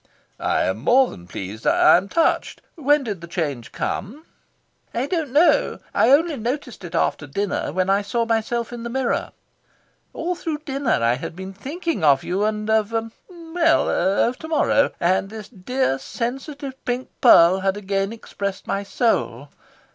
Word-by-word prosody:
"I -, -, +1 dB
am 95 Hz, +3 st, -1 dB
more 250 Hz, -, +4 dB
than 85 Hz, 0 st, -12 dB
pleased. 100 Hz, +4 st, -6 dB
I -, -, +6 dB
am 190 Hz, +3 st, 0 dB
touched. 330 Hz, 0 st, 0 dB
When 295 Hz, -2 st, +2 dB
did 205 Hz, -8 st, -5 dB
the 170 Hz, -, -8 dB
change 150 Hz, -9 st, -3 dB
come?" 265 Hz, +12 st, -4 dB, 0.7 s
"I 240 Hz, +3 st, 0 dB
don't 315 Hz, -3 st, -2 dB
know. 305 Hz, +6 st, +3 dB, 0.2 s
I 230 Hz, -, +3 dB
only 300 Hz, +2 st, +4 dB
noticed 245 Hz, -1 st, -4 dB
it 175 Hz, -1 st, -7 dB
after 150 Hz, -2 st, 0 dB
dinner, 200 Hz, +4 st, -2 dB
when 185 Hz, +3 st, 0 dB
I 195 Hz, +1 st, +3 dB
saw 230 Hz, +3 st, -1 dB
myself 230 Hz, +1 st, -1 dB
in 240 Hz, -, -6 dB
the 235 Hz, -, -5 dB
mirror. 260 Hz, 0 st, -1 dB, 0.8 s
All 350 Hz, +2 st, -2 dB
through 315 Hz, -3 st, -5 dB
dinner 270 Hz, -, 0 dB
I 115 Hz, +1 st, +3 dB
had 160 Hz, -, -7 dB
been 190 Hz, +1 st, -7 dB
thinking 295 Hz, -, -4 dB
of 140 Hz, -3 st, +4 dB
you 190 Hz, +3 st, -1 dB
and 215 Hz, 0 st, -2 dB
of 220 Hz, 0 st, +2 dB, 0.4 s
well, 335 Hz, -1 st, +1 dB
of 200 Hz, +7 st, +1 dB
to 320 Hz, -, -7 dB
morrow. 300 Hz, -3 st, +2 dB
And 185 Hz, +3 st, +1 dB
this 215 Hz, -1 st, -9 dB
dear 225 Hz, -, -1 dB
sensitive 270 Hz, -, -5 dB
pink 250 Hz, +1 st, -3 dB
pearl 185 Hz, -6 st, +7 dB
had 195 Hz, +1 st, 0 dB
again 195 Hz, 0 st, -1 dB
expressed 200 Hz, -3 st, -5 dB
my 195 Hz, -, -1 dB
soul. 145 Hz, -, -1 dB
220 Hz, 165 wpm, -22 LUFS, 185-270 Hz, 0.8 s, pearl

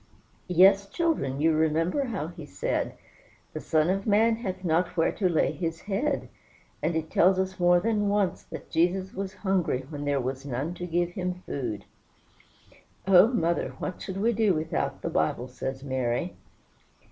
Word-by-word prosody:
"Yes, 195 Hz, +3 st, +5 dB
children; 300 Hz, -, -1 dB
you 160 Hz, +2 st, +4 dB
remember 165 Hz, -, +1 dB
how 200 Hz, -, -3 dB
he 170 Hz, -2 st, -10 dB
said, 95 Hz, -9 st, -2 dB, 0.6 s
'The -, -, -4 dB
Son 155 Hz, 0 st, +1 dB
of 195 Hz, +2 st, -2 dB
man 225 Hz, +2 st, +4 dB
hath 190 Hz, -5 st, -5 dB
not 170 Hz, +1 st, 0 dB
where 165 Hz, -, +3 dB
to 190 Hz, -3 st, 0 dB
lay 165 Hz, -, +2 dB
his 165 Hz, -2 st, -4 dB
head.' 235 Hz, +9 st, -1 dB, 0.5 s
And 160 Hz, +2 st, 0 dB
it 160 Hz, 0 st, -3 dB
tells 185 Hz, +2 st, +4 dB
us 190 Hz, 0 st, -2 dB
more 175 Hz, 0 st, +5 dB
than 210 Hz, +1 st, 0 dB
once 205 Hz, -2 st, +1 dB
that -, -, -9 dB
Jesus 180 Hz, +3 st, +1 dB
was 190 Hz, -1 st, -5 dB
hungry 180 Hz, -9 st, +1 dB
when 145 Hz, -2 st, -5 dB
there 145 Hz, -1 st, +1 dB
was 130 Hz, +1 st, -3 dB
none 140 Hz, +5 st, -3 dB
to 180 Hz, 0 st, -6 dB
give 175 Hz, +1 st, 0 dB
him 180 Hz, 0 st, -4 dB
food." 120 Hz, -7 st, -4 dB, 1.2 s
"Oh, 190 Hz, +1 st, +8 dB
mother, 170 Hz, -9 st, 0 dB
what 185 Hz, -, -5 dB
should 190 Hz, -1 st, -5 dB
we 225 Hz, +4 st, +2 dB
do 210 Hz, -4 st, +2 dB
without 155 Hz, +1 st, -2 dB
the -, -, -1 dB
Bible?" 115 Hz, +10 st, 0 dB
says 130 Hz, +1 st, -5 dB
Mary. 130 Hz, +5 st, -2 dB
175 Hz, 170 wpm, -27 LUFS, 155-195 Hz, 1.2 s, Oh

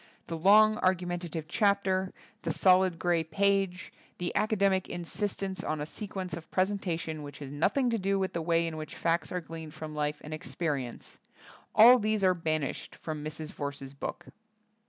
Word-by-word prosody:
The 165 Hz, -, -4 dB
long, 215 Hz, +6 st, +6 dB
argumentative 175 Hz, -4 st, -1 dB
chapter, 190 Hz, -1 st, +1 dB, 0.3 s
the -, -, -2 dB
solid 185 Hz, -2 st, +4 dB
grey 175 Hz, -1 st, +1 dB
page, 195 Hz, +2 st, 0 dB, 0.2 s
the 175 Hz, -1 st, -3 dB
academic 195 Hz, -3 st, +2 dB
insistence 190 Hz, +2 st, -3 dB
on 155 Hz, -, -2 dB
a 150 Hz, -, -2 dB
se 210 Hz, +7 st, -6 dB
quence 185 Hz, -2 st, -5 dB
of 165 Hz, -1 st, -10 dB
presentation 175 Hz, -5 st, -1 dB
which 145 Hz, -1 st, -8 dB
has 140 Hz, -2 st, -8 dB
nothing 225 Hz, -, +1 dB
to 230 Hz, -, 0 dB
do 195 Hz, +1 st, +1 dB
with 190 Hz, -1 st, -1 dB
the 170 Hz, -, -2 dB
way 165 Hz, +1 st, +2 dB
in 165 Hz, -1 st, -4 dB
which 155 Hz, 0 st, -7 dB
facts 170 Hz, +1 st, 0 dB
are 180 Hz, -, -2 dB
gleaned 160 Hz, -1 st, -9 dB
from 155 Hz, 0 st, -7 dB
life 150 Hz, 0 st, -1 dB
and 150 Hz, -, -7 dB
experi 150 Hz, -3 st, -2 dB
ence— 120 Hz, -, -11 dB, 0.6 s
^all 240 Hz, +3 st, +9 dB
these 215 Hz, -1 st, 0 dB
are 185 Hz, -1 st, +5 dB
banished 155 Hz, -4 st, -3 dB
from 155 Hz, -2 st, -5 dB
Mrs. 155 Hz, 0 st, -5 dB
Verse's 140 Hz, -2 st, -5 dB
book. 140 Hz, -, -6 dB
175 Hz, 175 wpm, -30 LUFS, 155-195 Hz, 0.6 s, ^all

